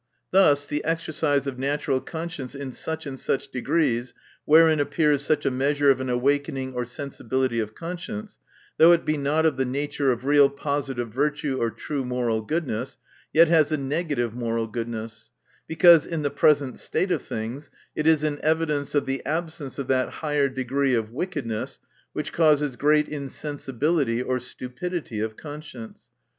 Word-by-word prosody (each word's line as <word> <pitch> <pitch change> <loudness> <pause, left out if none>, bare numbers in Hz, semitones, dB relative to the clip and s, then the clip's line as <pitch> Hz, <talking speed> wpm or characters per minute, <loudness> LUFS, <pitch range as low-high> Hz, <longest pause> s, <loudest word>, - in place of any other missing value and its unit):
Thus, 145 -7 +5
the 150 +1 -3
exercise 155 -3 0
of 135 -2 -4
natural 140 -1 0
conscience 160 -5 -6
in 140 -1 -5
such 160 +6 -5
and 135 -2 -6
such - - -1
degrees, 125 -2 0 0.3
wherein 160 0 +6
appears 145 -1 +2
such 150 0 0
a 135 - +2
measure 140 +2 +3
of 130 -1 0
an 130 - -3
awakening 135 +1 0
or 125 -1 -2
sensibility 130 -1 -2
of 110 -1 -4
conscience, 165 - -6 0.4
though 165 +2 +8
it 170 - +1
be 155 - +1
not 150 +2 +1
of 155 -5 +2
the 135 - +2
nature 140 +1 0
of 125 +1 -3
real 145 0 +6
positive 140 -4 -3
virtue 145 0 0
or 115 - +2
true 140 +3 -4
moral 125 -3 -1
goodness, 135 -2 -3 0.3
yet 165 +2 +6
has 160 -2 +4
a 155 - +2
negative 140 -4 -1
moral 115 -1 -1
goodness; 110 -1 -6 0.4
because 165 -1 +6
in 165 -3 -3
the 145 - 0
present 145 -2 +2
state 185 - -1
of - - +1
things, 115 +7 -6 0.3
it 155 - 0
is 160 -2 +4
an 150 -1 -1
evidence 155 -2 0
of 140 -1 +2
the 135 -1 -3
absence 160 -3 -4
of 140 -2 -4
that 130 -1 +1
higher 145 -3 0
decree 130 +1 0
of 110 -1 -2
wickedness, 135 - -4 0.3
which 150 -1 -4
causes 150 -4 +3
great 150 +3 +3
insensibility 140 -2 -2
or 125 0 -1
stupidity 125 +2 -5
of 110 0 -3
conscience. 145 -7 -10
140 Hz, 165 wpm, -25 LUFS, 125-150 Hz, 0.4 s, though